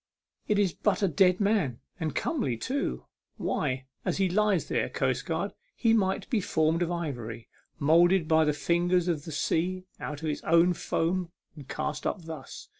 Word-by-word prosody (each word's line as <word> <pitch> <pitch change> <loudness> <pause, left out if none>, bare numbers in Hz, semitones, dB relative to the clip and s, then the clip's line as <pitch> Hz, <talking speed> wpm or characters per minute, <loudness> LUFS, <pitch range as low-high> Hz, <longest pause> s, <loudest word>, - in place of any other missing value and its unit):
It 210 - +2
is 200 -4 +2
but 210 -1 0
a - - +5
dead 180 +3 +3
man, 200 - +1 0.2
and 160 -3 -2
comely 190 - -1
too. 275 - -2 0.3
Why, 130 -3 -1 0.2
as - - -1
he 190 -1 +3
lies 205 -1 +2
there, - - 0
coastguard, - - -1 0.2
he 230 -2 +3
might 195 -4 +1
be 225 -5 +2
formed 160 -1 +1
of 175 - +1
ivory, 120 -10 -4 0.3
moulded 170 +3 +4
by 160 0 +4
the 150 - +3
fingers 175 +4 +1
of 155 -4 -1
the 160 - -6
sea 180 +5 0 0.2
out 150 +1 -6
of 155 - 0
its 150 - -3
own 170 +2 +4
foam, 175 +1 -1 0.3
and 145 -4 -11
cast 150 0 -3
up 180 - -3
thus. 160 -5 -8
170 Hz, 175 wpm, -28 LUFS, 150-190 Hz, 0.3 s, a